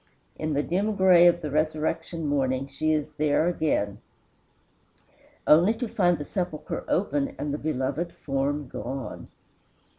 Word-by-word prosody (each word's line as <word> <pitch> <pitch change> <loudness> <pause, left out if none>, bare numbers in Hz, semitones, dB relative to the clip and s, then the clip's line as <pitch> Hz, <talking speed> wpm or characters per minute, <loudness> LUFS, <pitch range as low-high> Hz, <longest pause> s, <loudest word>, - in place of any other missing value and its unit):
In 155 0 -2
the 145 +1 +1
dim 200 +7 0
gray 180 -2 +6
of 175 0 +3
the 150 - -3
resurrection 155 +2 -1
morning 135 -2 0
she 155 +3 -1
is 155 -1 -1
there 150 +2 +2
again, 145 - 0 1.5
only 175 +9 +5
to 245 +1 -3
find 175 -5 +2
the 145 - -6
sepulchre 175 -4 -4
open 145 -7 0
and 145 -1 -3
the 150 - -3
beloved 150 +3 -2
form 140 +1 -2
gone. 130 +5 -6
155 Hz, 140 wpm, -26 LUFS, 140-175 Hz, 1.5 s, gray